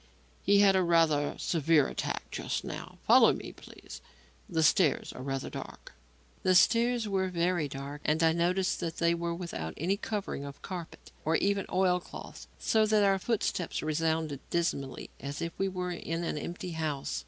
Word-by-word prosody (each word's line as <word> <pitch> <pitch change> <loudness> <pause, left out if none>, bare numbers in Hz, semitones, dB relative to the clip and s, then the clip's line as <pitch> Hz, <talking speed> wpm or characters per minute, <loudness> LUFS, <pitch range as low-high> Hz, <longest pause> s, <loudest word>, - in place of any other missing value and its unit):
He 200 +1 +4
had 195 -1 +6
a 190 - +4
rather 165 -4 +3
severe 160 -3 +2
attack - - -3
just - - -3
now. - - -7
Follow - - +7
me, - - -7
please. - - -12 0.5
The 160 - +1
stairs 155 +1 +3
are - - -8
rather 135 0 -3
dark." - - -9 0.5
The 185 0 +3
stairs 235 +4 +4
were 190 -2 0
very 175 -3 0
dark, 140 +2 -7
and 155 +2 +1
I 165 - +5
noticed 180 +3 +1
that 165 -2 -4
they 170 0 +3
were 170 0 -2
without 165 - -5
any 185 +6 0
covering 205 -8 -4
of 140 0 -8
carpet, 175 -4 -8
or 160 +1 +1
even 200 +2 +1
oil 180 -1 +3
cloth, - - -10
so 220 -1 +2
that 215 -1 +4
our 195 -1 +3
footsteps 195 -7 -1
resounded 160 -2 0
dismally 140 -6 -2
as 140 +2 -5
if 170 0 -3
we 195 - +2
were 180 -1 -3
in 170 -1 -3
an 170 - -2
empty 175 +4 -5
house. 150 - -2
170 Hz, 175 wpm, -30 LUFS, 155-190 Hz, 0.5 s, Follow